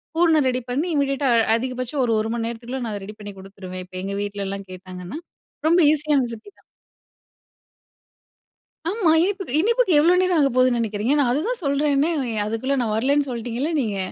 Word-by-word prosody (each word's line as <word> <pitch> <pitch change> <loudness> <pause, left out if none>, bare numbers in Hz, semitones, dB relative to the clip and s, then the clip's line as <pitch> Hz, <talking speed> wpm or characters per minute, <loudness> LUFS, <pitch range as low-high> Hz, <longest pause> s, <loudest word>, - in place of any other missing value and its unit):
பூரணம் 320 -4 +3
ரெடி 255 0 -1
பண்ணி, 295 +8 0
இம்மிடியட்டா 275 -1 +1
அ - - +4 0.2
அதிகபட்சம் 255 +2 -3
ஒரு, 230 - +1
1 220 - -3
மணி 230 -1 -2
நேரத்துக்குள்ள 240 +2 -5
நான் 220 - -4
அத 200 - -6
ரெடி 210 - -9
பண்ணிக் 205 -2 -9
குடுத்துருவேன், 190 -1 -9
இப்ப 185 - -14
எங்க 200 +1 -3
வீட்ல 200 -1 -4
எல்லாம் 195 0 -6
கேட்டாங்கன்னா. 185 - -8 0.5
ரொம்ப 340 +3 +4
ஈஸியான 300 -2 +2
ரெசிபி 235 - -9
தான். - - -28 2.3
ஆமா, 390 -3 +1
இனிப்புக்கு 380 -7 -1
இனிப்புக்கு 465 +1 +2
எவ்ளோ 335 +4 +5
நேரம் 365 -2 +2
ஆகப்போகுதுன்னு 255 -2 +3
நெனைக்கிறீங்க? 220 +3 0
நான் 270 -4 +3
அதுதான் 395 - -1
சொல்றேனே, 285 +2 +1
அ, - - -1 0.2
அதுக்குள்ள 225 +6 -1
நான் 220 -3 -1
வரலன்னு 280 +5 +1
சொல்லிட்டீங்கள 240 +5 -3
நீங்க. 210 -5 -2
255 Hz, 170 wpm, -22 LUFS, 215-295 Hz, 2.3 s, எவ்ளோ